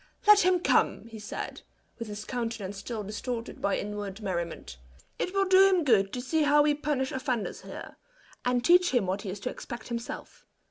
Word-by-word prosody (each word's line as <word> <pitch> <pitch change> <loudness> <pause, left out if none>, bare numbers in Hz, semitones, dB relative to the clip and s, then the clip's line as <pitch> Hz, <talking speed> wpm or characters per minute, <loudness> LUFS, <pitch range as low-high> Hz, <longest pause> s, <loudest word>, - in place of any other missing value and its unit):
"Let 420 0 +8
him 360 -2 +3
come," 350 - +2
he 225 -1 -10
said, 205 - -6 0.4
with 230 - -5
his 210 0 -6
countenance 225 -5 -4
still 220 +1 -5
distorted 230 +3 -5
by 200 - +1
inward 205 -1 -5
merriment; 170 - -4 0.4
"It 360 - -1
will 390 0 +2
do 385 +1 +7
him 370 -3 +3
good 205 -8 +3
to 250 - -3
see 310 +5 0
how 295 0 +5
we 295 0 +3
punish 290 -3 -1
offenders 255 -4 -2
here, - - -9 0.5
and 245 0 +1
teach 355 +1 +6
him 240 - +3
what 190 +2 -2
he 205 - -5
is 195 +2 -5
to 250 - -2
expect 235 -1 -8
himself. 235 0 -6
240 Hz, 190 wpm, -28 LUFS, 205-295 Hz, 0.5 s, Let